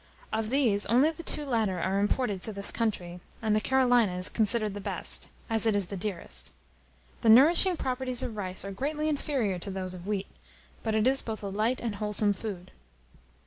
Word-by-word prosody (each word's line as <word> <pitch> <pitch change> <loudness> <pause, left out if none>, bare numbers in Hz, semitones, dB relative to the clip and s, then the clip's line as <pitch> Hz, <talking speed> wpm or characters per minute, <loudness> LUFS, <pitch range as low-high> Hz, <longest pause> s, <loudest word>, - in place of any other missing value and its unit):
Of 220 -1 -1
these, 235 -6 +3
only 255 +8 +4
the 325 - -9
two 300 -2 -1
latter 220 -8 0
are 190 +3 0
imported 205 -1 0
to 220 - -1
this 200 -1 +1
country, 180 -6 -2 0.2
and 215 -2 +1
the 215 - +2
Carolina 245 -7 +3
is 180 - +3
considered 215 -1 0
the 205 - -6
best, - - -3 0.2
as 225 -1 +1
it 215 - +2
is 200 -2 +3
the 200 - -6
dearest. 175 - -3 0.7
The 225 - +3
nourishing 330 - +6
properties 255 -2 0
of 225 - -4
rice 190 -2 -4
are 195 - -5
greatly 295 +9 -2
inferior 270 - -1
to 195 - -6
those 190 -1 -4
of 180 +1 -9
wheat; 200 -2 -1 0.6
but 220 -1 -1
it 215 0 +2
is 270 +1 +3
both 220 -2 -6
a 200 - -3
light 215 +6 0
and 230 -3 -3
a - - -8
wholesome 210 0 +2
food. 190 -3 -7
215 Hz, 200 wpm, -28 LUFS, 195-250 Hz, 0.7 s, nourishing